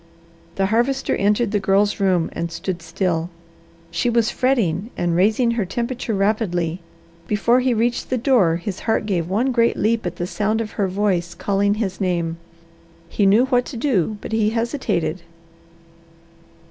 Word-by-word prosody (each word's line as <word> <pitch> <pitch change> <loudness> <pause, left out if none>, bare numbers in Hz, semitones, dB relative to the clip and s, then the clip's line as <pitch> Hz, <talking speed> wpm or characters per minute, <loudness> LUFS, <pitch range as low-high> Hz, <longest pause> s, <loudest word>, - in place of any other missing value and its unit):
The 195 - +1
Harvester 240 +6 +1
entered 205 +2 +1
the 210 - +1
Girl's 200 +2 +2
room 185 -4 +1
and 170 0 -3
stood 175 +1 -4
still. 165 0 -2 0.6
She 240 - 0
was 235 -1 +2
fretting 225 -7 0
and 175 -1 0
raising 215 +6 +3
her 230 -2 0
temperature 235 +3 -3
rapidly. 190 -4 0 0.5
Before 235 +4 +3
he 250 -1 +1
reached 235 +2 0
the 255 - 0
door 230 - +3
his 180 +3 -5
heart 220 - +1
gave 175 -5 -1
one 235 +8 +1
great 235 -2 +2
leap 225 +2 +1
at 175 - -5
the 175 - -3
sound 215 +4 -1
of 220 -2 -4
her 200 - -1
voice 185 -3 -1
calling 200 0 +1
his 210 -3 -3
name. 170 -3 -1 0.7
He 200 - +2
knew 215 +6 +5
what 250 -2 +2
to 260 - -7
do, 220 - 0
but - - -7
he 220 -1 +2
hesitated. 225 - -1
205 Hz, 160 wpm, -21 LUFS, 180-235 Hz, 0.7 s, knew